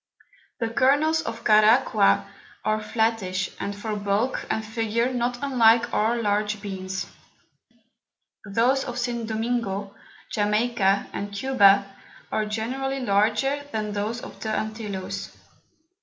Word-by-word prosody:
The 230 -2 -1
Kernels 285 +7 +3
of 230 -7 -6
Caraqua 215 -1 +4 0.4
are 215 0 +1
flattish, 215 -4 -1
and 200 0 -3
for 210 +1 -4
Bulk 205 +5 -1
and 220 - -1
Figure 225 +3 -1
not 245 0 -1
unlike 235 -3 +4
our 225 +3 +1
large 210 -1 0
Beans. 190 -2 -5 1.4
Those 235 +6 +2
of 245 -1 -6
St. 240 -2 -2
Domingo, 220 -3 -2 0.4
Jamaica, 210 -1 +1
and 205 0 -4
Cuba, 200 -3 +4 0.5
are 215 -1 0
generally 265 +5 -3
larger 230 +6 +1
than 215 -1 -2
those 215 +4 -2
of - - -10
the 220 - -4
Antilloes. 215 -3 -4
220 Hz, 115 wpm, -25 LUFS, 205-240 Hz, 1.4 s, Caraqua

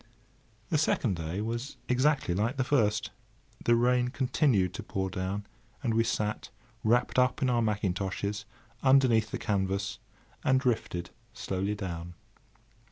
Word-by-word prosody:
The 155 - +2
second 120 -8 +1
day 85 +4 -3
was 115 +5 -4
exactly 130 - +2
like 110 +8 0
the 130 - +2
first. 110 -6 +1 0.5
The 120 - +4
rain 125 +1 +3
continued 125 - +1
to - - -5
pour 95 -1 -3
down, 95 +2 -3 0.4
and 115 -4 +1
we 115 +1 +3
sat, 105 -2 -2 0.3
wrapped 120 +3 +3
up 130 +3 +2
in 130 - +3
our 120 -1 +2
mackintoshes, 100 -1 -1 0.4
underneath 130 -5 +4
the - - -3
canvas, 95 -1 -1 0.4
and 130 0 +4
drifted 110 -9 -1 0.2
slowly 95 +2 -2
down. 85 -3 -5
110 Hz, 135 wpm, -29 LUFS, 95-125 Hz, 0.5 s, The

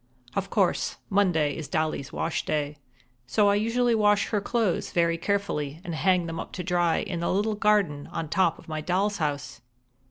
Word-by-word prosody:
Of 195 0 -1
course, 195 -5 +1
Monday 170 -8 +2
is 160 -3 -6
Dolly's 155 -2 -2
wash 165 - -2
day, 150 -1 -2 0.5
so 205 - +3
I - - +4
usually 230 +3 +2
wash 210 -2 +3
her 210 -2 0
clothes 220 -3 0
very 170 -1 +2
carefully 165 -6 -2
and 175 - -5
hang 180 +2 +2
them 165 0 -5
up - - -7
to 180 - -4
dry 175 -2 +2
in 180 -3 -4
the 170 - 0
little 210 +3 +1
garden 205 -9 +1
on 165 - -3
top 170 +1 +2
of - - -16
my 155 -1 -3
doll's 195 +5 0
house. 145 -3 -3
175 Hz, 185 wpm, -26 LUFS, 155-205 Hz, 0.5 s, I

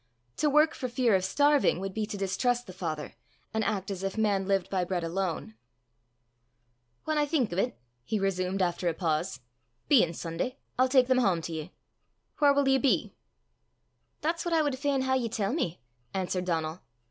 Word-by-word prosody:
To 300 - +2
work 300 +2 +4
for 255 - -4
fear 240 -2 +2
of 190 -1 +3
starving 285 -1 +3
would 195 0 -4
be 215 0 -2
to 210 -1 -5
distrust 245 +6 0
the 185 - -10
Father, 160 -5 -4 0.4
and 220 0 0
act 200 -2 -2
as 190 -2 -4
if 195 +2 -3
man 200 -3 +1
lived 195 -2 +1
by 185 -2 0
bread 180 -1 -2
alone. 170 - -2 1.5
"Whan 310 -1 0
I 295 - +2
think 270 - +1
o' - - -3
't," 240 +7 0 0.3
he 215 - -1
resumed 190 0 0
after 175 0 -1
a 165 - -3
pause, 160 -3 -1 0.5
"bein' 180 - +5
Sunday, 170 +11 -3 0.2
I'll 255 0 +4
tak 255 -1 +5
them 255 0 +3
hame 185 -8 +2
to 165 - -5
ye. 160 +2 -5 0.7
Whaur 290 -1 +6
wull 285 -1 +3
ye 270 0 +4
be?" 270 - +1 1.1
"That's 330 +2 -1
what 345 -1 0
I 315 - +4
wad 280 -3 -1
fain 280 -1 +1
hae 260 0 +2
ye 235 -3 -1
tell 215 0 -1
me," 180 - -2 0.3
answered 185 -1 -1
Donal. 165 -1 -2
200 Hz, 190 wpm, -29 LUFS, 180-260 Hz, 1.5 s, Whaur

